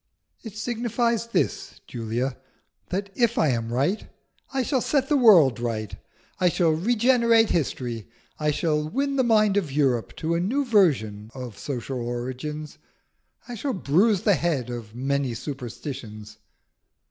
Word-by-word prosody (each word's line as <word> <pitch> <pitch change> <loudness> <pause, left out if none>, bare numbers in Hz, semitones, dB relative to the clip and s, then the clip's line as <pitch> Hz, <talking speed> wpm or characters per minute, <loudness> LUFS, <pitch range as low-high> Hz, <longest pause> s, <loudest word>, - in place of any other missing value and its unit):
"It 220 -3 -9
signifies 235 0 -1
this, 230 - -2
Julia, 120 +2 -3 0.5
that 195 +2 -3
if 235 +1 +1
I 155 - +3
am 115 -2 -1
right 140 - 0 0.4
I 270 -1 0
shall 260 -1 0
set 275 0 0
the 300 - +3
world 180 - +6
right; 110 -4 -3 0.4
I 180 - +4
shall 170 -1 +2
regenerate 230 +5 +3
history; 125 -8 -2 0.3
I 150 0 +1
shall 150 0 0
win 275 - -1
the 260 - +3
mind 215 -4 +3
of 170 -8 -1
Europe 135 -5 0
to 160 +1 -2
a 170 - +1
new 255 +11 0
view 125 - +2
of 125 -5 -7
social 130 -1 -4
origins; 130 +6 -5 0.7
I 245 - -6
shall 260 +4 -2
bruise 190 +3 +2
the 205 - +4
head 145 -9 -1
of 115 -2 -7
many 135 -1 -1
superstitions." 115 -5 -7
155 Hz, 145 wpm, -25 LUFS, -, 0.7 s, world